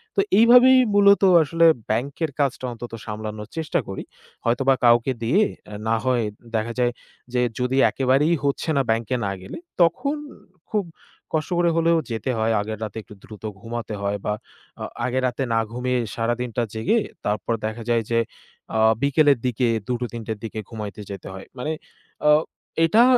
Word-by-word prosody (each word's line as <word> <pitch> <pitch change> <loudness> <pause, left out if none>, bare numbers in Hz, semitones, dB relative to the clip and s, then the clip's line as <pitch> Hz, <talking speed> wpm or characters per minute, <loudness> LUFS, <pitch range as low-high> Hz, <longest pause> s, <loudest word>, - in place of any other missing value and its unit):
তো - - +4 0.2
এইভাবেই 250 +3 +8 0.2
মূলত 200 0 +6 0.2
আসলে 165 +2 +2 0.3
bank-এর 140 +7 -1
কাজটা 135 -2 0
অন্তত 120 0 -9
সামলানোর 105 -1 -6
চেষ্টা 160 +2 0
করি। 95 - -5 0.4
হয়তোবা 130 +3 +3
কাউকে 120 +2 +5
দিয়ে, 170 - +3 0.4
না 115 - +3
হয় 125 -2 +2 0.3
দেখা 110 +2 -1
যায় 120 -1 +2 0.4
যে 125 - +2 0.2
যদি 125 +1 0
একেবারেই 135 +5 +2
হচ্ছে 140 +3 -1
না 135 - +4
bank-এ 115 +3 0
না 100 - -1
গেলে, 95 - -8 0.2
তখন 175 - +2 0.6
খুব 210 -2 +1 0.5
কষ্ট 155 +1 0
করে 175 -1 +4
হলেও 165 0 +4
যেতে 115 +4 -3
হয়। 110 +1 +1
আগের 110 +1 -4
রাতে 110 0 -6
একটু - - -14
দ্রুত 105 -1 -12 0.2
ঘুমাতে 115 -2 -5
হয় 100 0 -1
বা 105 - +1 0.5
আ - - -2 0.2
আগে 125 +1 0
রাতে 125 +2 -2
না 115 - +3
ঘুমিয়ে 125 +1 -1 0.2
সারাদিনটা 120 +1 -1
জেগে 185 - +2 0.3
তারপর 105 +3 -1
দেখা 110 +2 -4
যায় 115 -1 +2
যে 115 - +3 0.6
আ - - +2 0.2
বিকেলের 140 -1 +4
দিকে 125 0 +1 0.2
২-৩ 120 -1 -3
টের 110 -2 -3
দিকে 110 0 -5
ঘুমাইতে 105 -2 -6
যেতে 100 - -7
হয়। 95 0 -9
মানে 125 +5 -2 0.6
আ - - +7 0.6
এটা 215 +8 +5
125 Hz, 160 wpm, -23 LUFS, 110-150 Hz, 0.6 s, এইভাবেই